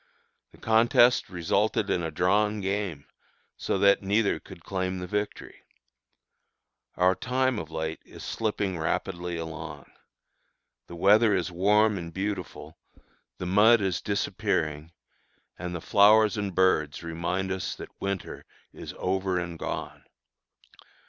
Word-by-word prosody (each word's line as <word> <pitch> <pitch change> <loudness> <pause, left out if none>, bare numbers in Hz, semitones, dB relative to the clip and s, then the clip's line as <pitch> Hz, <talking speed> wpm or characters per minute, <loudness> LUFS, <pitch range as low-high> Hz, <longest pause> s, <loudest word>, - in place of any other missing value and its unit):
The - - -18
contest 115 +2 +4
resulted 100 +4 0
in 90 - +1
a 80 - -2
drawn 105 +6 +1
game, 95 -6 -3 0.5
so - - -2
that 100 +1 +4
neither 100 +2 +1
could - - -14
claim 95 -1 -2
the 90 - -5
victory. 105 +3 -4 1.3
Our 90 +1 +4
time, 125 +2 0
of 80 - -7
late, 80 0 -4
is - - -12
slipping 100 -5 -2
rapidly 85 +1 -2
along. 80 -3 -7 1.0
The 85 - -9
weather 105 +4 +4
is 90 0 -1
warm 105 +3 +3
and 85 -1 -7
beautiful, 95 -3 -5 0.6
the 90 - -5
mud 105 +6 +5
is 95 -4 -1
disappearing, 80 -6 -2 0.7
and 90 0 -4
flowers 105 +2 +5
and 100 -4 -3
birds 80 -5 +2
remind 85 +3 -2
us 95 -1 -3
that - - -9
winter 100 -1 -4 0.3
is - - -9
over 95 0 -1
and 85 -2 -6
gone. - - -5
95 Hz, 125 wpm, -27 LUFS, 85-105 Hz, 1.3 s, mud